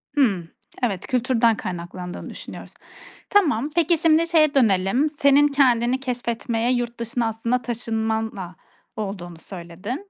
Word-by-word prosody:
Hıı. 200 - +2 0.4
Evet, 200 -7 -1
kültürden 235 -3 +2
kaynaklandığını 180 0 -6
düşünüyoruz. - - -9 0.6
Tamam. 300 - +3
Peki, 340 0 +3
şimdi 330 0 +3
şeye 310 -3 +4
dönelim, 230 +3 +3
senin 285 0 +4
kendini 255 -3 +2
keşfetmeye, 240 -2 -2
yurt 240 -1 -2
dışına 235 0 -1
aslında 230 +3 -1
taşınmanla 220 -5 -3 0.4
olduğunu 185 -5 -6
söyledin. 195 - -7
235 Hz, 115 wpm, -23 LUFS, 205-275 Hz, 0.6 s, şeye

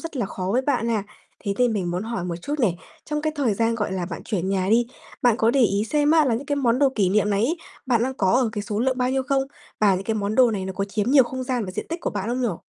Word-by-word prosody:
rất 330 -3 -7
là 240 -6 -1
khó 185 -1 -5
với 255 +3 +2
bạn 250 -5 0
ha. 220 -3 0 0.4
Thế 200 - 0
nên 245 -2 +3
mình 185 -5 -1
muốn 180 +2 -2
hỏi 225 -4 -4
một 175 -1 -3
chút 290 - -3
này, 190 -8 +2 0.3
trong 300 -1 -3
cái 310 0 0
thời 250 -8 +1
gian, 230 +2 +1
gọi 210 -4 -2
là, 180 -2 -2
bạn 165 - -6
chuyển 190 -4 -2
nhà 190 -1 0
đi, 235 +1 +4 0.4
bạn 240 -3 +4
có 225 -1 +3
để 275 - +2
ý 205 -3 +2
xem 295 +5 +1
á 320 -1 +5
là 245 -5 +1
những 270 +5 -4
cái 285 0 -1
món 250 -2 +2
đồ 280 - +5
kỷ 200 -4 +2
niệm 210 +2 +2
này 200 +2 +2
ấy, 325 +8 0 0.3
bạn 240 -3 +2
đang 260 +2 -1
có 190 -7 +1
ở 245 -1 +3
cái 210 -2 -3
số 210 0 -3
lượng 260 +1 +1
bao 250 0 +1
nhiêu 265 0 0
không? 270 0 +1 0.4
Và 205 -2 +5
những 190 +1 -3
cái 225 - -1
món 210 0 -2
đồ 255 -2 +5
này 200 -4 -3
nó 190 - -4
có 195 +1 -2
chiếm 210 +3 -2
nhiều 275 -2 +7
không 260 +1 -5
gian 250 -3 -1
và 185 - -5
diện - - -5
tích 335 +1 -4
của - - -2
bạn 205 +1 -3
không 250 +2 -1
nhỉ? 210 -9 0
230 Hz, 320 wpm, -23 LUFS, 200-260 Hz, 0.4 s, nhiều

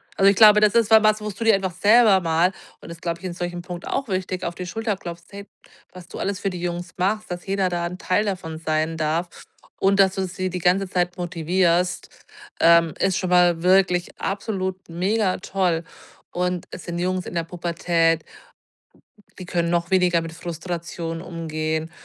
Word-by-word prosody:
Also, 195 0 +5
ich 200 - +3
glaube, 210 -1 +8
das 210 0 +4
ist 230 -2 +3
wa 220 -1 +7
was, 215 0 +3
wo 210 - -4
du 205 +3 -6
dir 225 -2 +5
einfach 190 -2 -2
selber 205 0 +5
mal, 170 +3 +2 0.3
und - - -12
das, 170 0 -10
glaube 170 -1 -3
ich, 190 - -11
in 180 - -4
solchem 175 0 -4
Punkt 175 0 -8
auch 270 - -2
wichtig, 185 -2 -3
auf 170 0 -4
die 180 - -6
Schulter 220 +2 -2
klopfst, 170 -2 -9
hey, 200 0 -8 0.5
was 180 -1 -12
du - - -9
alles 200 0 -2
für 195 - -1
die 180 -2 -6
Jungs 175 0 -4
machst, 210 +4 -1
dass 175 0 -6
jeder 195 -1 0
da 175 -1 -2
'n 180 +1 -5
Teil 185 +2 0
davon 170 -5 -4
sein 160 0 -1
darf 160 +3 -1 0.5
und 195 +1 +2
dass 190 -1 +4
du 190 - -1
sie 185 +1 -3
die 180 - -4
ganze 185 +3 +2
Zeit 180 0 -1
motivierst, 175 +1 0 0.5
ähm, 170 -1 +5
ist 190 -1 +1
schon 185 - -2
mal 175 -2 +4
wirklich 180 -1 +2
absolut 190 -2 -3
mega 185 +3 0
toll. 180 -3 -1 0.5
Und 180 0 -2
es 180 - -9
sind 170 0 -4
Jungs 185 0 -1
in - - -7
der 170 - 0
Pubertät 165 -1 0 1.2
die 185 - -8
können 170 -1 -1
noch 170 +1 0
weniger 180 -3 +3
mit 165 0 -7
Frustration 170 0 -5
umgehen. 160 -2 -3
180 Hz, 195 wpm, -23 LUFS, 170-190 Hz, 1.2 s, glaube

